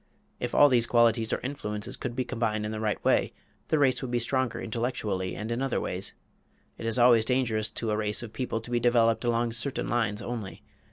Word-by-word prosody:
If - - -3
all 145 - +8
these 120 -4 +3
qualities 115 -2 +3
or - - 0
influences 105 -6 -4
could 120 - -5
be 130 -1 -1
combined 110 -2 -1
in 105 - -3
the 110 - -4
right 110 -1 0
way, - - +2 0.3
the 155 - +2
race 135 -3 +3
would 130 - -4
be 120 - 0
stronger 130 +1 -1
intellectually 110 -6 -2
and 110 +3 -5
in 120 +2 -1
other 135 -2 0
ways. 95 +2 -3 0.6
It 115 - -4
is 115 - 0
always 120 -2 +6
dangerous 115 -3 0
to 115 -2 -3
a - - +1
race 105 +1 0
of 110 - -9
people 125 -3 -3
to 120 - -11
be 120 - +2
developed 115 -1 +3
along 120 -1 0
certain 130 +4 -2
lines 110 -4 0
only. 115 -4 -6
115 Hz, 215 wpm, -28 LUFS, 110-125 Hz, 0.6 s, all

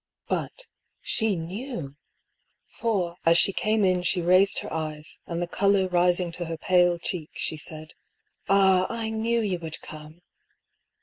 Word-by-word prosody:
But - - -1 0.2
— - - -52
she 220 -3 +2
knew! 175 - -6 0.7
For 185 -7 -2
as 165 +1 +5
she 195 - +4
came 215 0 +1
in 185 -1 +2
she 180 +1 +1
raised 185 +3 +4
her - - -7
eyes, 155 -1 -4
and 170 0 -2
the - - -3
colour 195 +1 +2
rising 180 0 +2
to 175 +1 -4
her 165 0 -5
pale 175 +1 +3
cheek 170 -2 -4
she - - -2
said: 155 0 -7 0.3
" - - -32
Ah, 190 -2 +4
I 225 -1 -3
knew 230 +1 0
you 190 -5 -1
would 160 -2 -6
come 155 +3 -11
180 Hz, 165 wpm, -26 LUFS, 165-200 Hz, 0.7 s, as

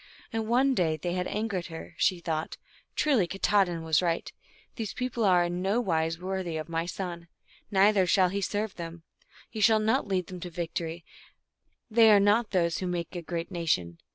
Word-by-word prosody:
And 225 -1 -2
one 260 +4 +3
day 170 -9 +1
when 155 - -5
they 175 -1 -1
had 180 0 -1
angered 205 -4 -2
her, 165 0 -9
she 185 0 +2
thought, 160 -2 -3 0.2
" - - -34
Truly 260 - +2
Katahdin 195 -3 +1
was 160 0 +2
right; 170 -2 -1 0.4
these 220 -4 -5
people 250 -2 -2
are 180 -3 +5
in 175 +1 -2
nowise 175 -6 0
wor 190 +2 -3
thy 175 -3 -4
of 155 0 -4
my 165 0 -2
son, 175 -2 -5 0.4
neither 195 -1 +4
shall 185 0 +4
he 200 +2 -2
serve 205 +1 -2
them; 165 -1 -7 0.4
he 215 - -6
shall 220 +1 +6
not 220 +4 +1
lead 185 -2 0
them 180 +1 -8
to 180 - -6
victory; 165 0 -4 0.9
they 225 0 +6
are 205 - +7
not 205 +4 +4
of - - -36
those 170 -3 +1
who 185 - -3
make 175 0 -3
a 175 - -3
great 170 +1 -5
nation." 155 - -1
180 Hz, 200 wpm, -28 LUFS, 170-205 Hz, 0.9 s, are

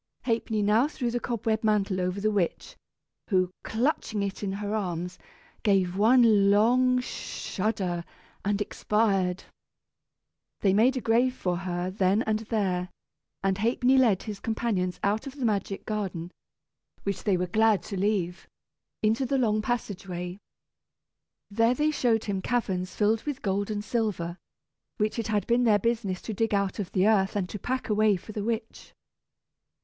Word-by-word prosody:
Ha'penny 225 -3 0
now 215 +6 +4
threw 250 -5 -3
the 245 - -1
cobweb 225 -2 -1
mantle 200 -3 +1
over 180 +2 -1
the 215 +2 +1
witch, 195 -5 -1 0.5
who, 185 -3 +2
clutching 220 -3 -1
it 195 -1 -4
in 195 -2 -2
her 205 +1 -3
arms, 180 -3 -3 0.4
gave 190 -4 +2
one 215 -2 +5
long 250 +5 +4
shudder 190 -7 -3 0.4
and 205 0 0
expired. 195 -3 0 1.2
They 195 -2 +3
made 245 +6 +4
a - - -2
grave 245 +3 +2
for 180 -6 -1
her 175 0 -3
then 195 +3 +2
and 215 -2 0
there; 185 -5 0 0.5
and 195 0 +1
Ha'penny 245 +4 +3
led 235 -8 +4
his 210 -3 -6
companions 210 -5 -1
out 210 +5 0
of 275 - -8
the 270 -4 -2
magic 200 -2 -1
garden, 190 -5 -3 0.7
which 200 -2 -3
they 195 -3 +2
were 180 - 0
glad 215 0 +3
to 200 - -6
leave, 190 -3 -1 0.6
into 220 +4 +2
the 270 +2 0
long 215 -4 +2
passage 210 -4 -3
way. 180 +1 -5 1.1
There 230 +4 +3
they 300 +3 +2
showed 235 -6 +1
him 195 -2 -2
caverns 185 -6 -1
filled 215 +1 +2
with 285 -2 -4
gold 200 +1 0
and 210 -1 -3
silver, 190 -8 -2 0.6
which 215 +2 0
it 225 - -2
had 210 -2 0
been 240 +1 +2
their 215 -3 +5
business 205 -4 -1
to 220 - -4
dig 225 +1 0
out 200 +1 -1
of 195 -3 -4
the 190 +2 +3
earth 195 -3 +3
and 195 -3 0
to 210 - -6
pack 260 +5 -2
away 215 -1 +3
for 190 +4 -8
the 210 -1 -4
witch. 225 0 -4
210 Hz, 160 wpm, -27 LUFS, 190-230 Hz, 1.2 s, one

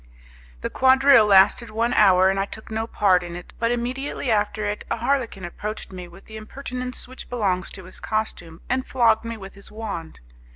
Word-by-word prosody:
The - - -3
quadrille 265 -3 +5
lasted 200 +4 +5
one 230 +2 0
hour, 190 -2 +5
and 195 - -2
I 195 - +1
took 220 +1 -10
no 220 +1 -2
part 190 -5 +3
in 175 -1 -7
it, 175 - -10
but 230 - +1
immediately 245 +2 -2
after 210 0 0
it, 205 0 -3
a - - -1
Harlequin 235 -6 -1
approached 210 +5 -6
me 180 -1 -8
with 175 +3 -16
the 220 - -10
impertinence 250 +3 -5
which 255 +1 -11
belongs 195 -7 -1
to 190 - -9
his 185 - -9
costume, 175 -7 -4
and 255 +1 0
flogged 235 -4 +2
me 230 0 -5
with 195 -2 -10
his 200 - -14
wand. 205 -7 -6
215 Hz, 195 wpm, -23 LUFS, 190-240 Hz, -, quadrille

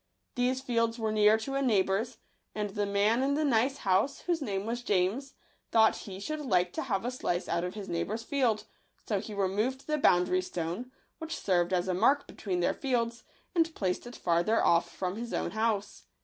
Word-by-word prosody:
These 255 +1 0
fields 230 -2 0
were 220 -2 -1
near 215 0 +5
to 245 +5 -5
a 275 - 0
neighbour's; 220 0 +1 0.4
and 210 -1 -2
the 205 0 -1
man 205 +4 +2
in 280 +1 +1
the 305 +1 +1
nice 265 +1 +2
house, 200 +8 +1
whose 345 -3 -1
name 200 -6 -2
was 235 +2 -2
James, 210 +6 0 0.4
thought 220 -1 +5
he 190 -2 -8
should 310 +10 -4
like 180 -10 +1
to - - -2
have 220 -5 -2
a 245 - -1
slice 180 -8 -2
out 170 +1 0
of 180 +2 -4
his 205 -2 -6
neigh 170 0 -1
bour's 220 +3 -4
field; 230 -5 +1 0.4
so 205 -3 +1
he 210 +2 -7
removed 210 +7 -1
the 305 -1 0
boundary 180 -5 +4
stone, 180 +7 -4 0.3
which 320 0 -4
served 175 -2 +1
as 180 0 +1
a 185 - +1
mark 240 +10 +3
between 180 -3 -3
their - - +2
fields, 235 -3 -1 0.3
and 330 -2 +1
placed 185 +3 -2
it 240 - -9
farther 175 +6 +2
off 170 0 +3
from 185 +2 -4
his 235 +1 -4
own - - -1
house. 220 -2 -1
220 Hz, 205 wpm, -30 LUFS, 190-255 Hz, 0.4 s, near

